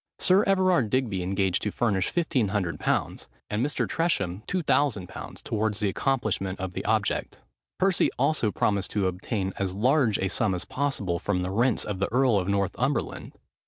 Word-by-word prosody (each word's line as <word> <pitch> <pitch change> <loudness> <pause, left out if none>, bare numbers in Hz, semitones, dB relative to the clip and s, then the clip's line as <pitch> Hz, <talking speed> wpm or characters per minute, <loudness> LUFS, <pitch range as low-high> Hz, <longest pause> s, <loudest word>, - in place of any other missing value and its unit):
Sir 190 +3 +4
Everard 185 - +3
Digby 110 -6 0
engaged 95 0 0
to 105 - -1
furnish 100 -6 0
1500_l._, 105 - -1 0.2
and 105 +3 0
Mr. 145 +1 -1
Tresham 100 - -1
2000_l._, 145 - -1
towards 110 -1 -1
the 105 -1 +1
accomplishment 100 -5 -1
of 95 -1 -4
the - - -4
object. - - -1 0.4
Percy 190 -1 +3
also 155 -8 +2
promised 100 -2 0
to 105 -2 +1
obtain 95 +1 -2
as 95 -2 -1
large 125 0 +3
a 95 - 0
sum 95 +1 +1
as 90 - -4
possible 120 -11 -1
from 90 0 -1
the 90 - -3
rents 120 +3 +1
of 105 -3 -4
the 100 - -1
earl 125 -4 +3
of 90 - -3
Northumberland. 100 -2 -1
105 Hz, 160 wpm, -26 LUFS, 95-135 Hz, 0.4 s, Sir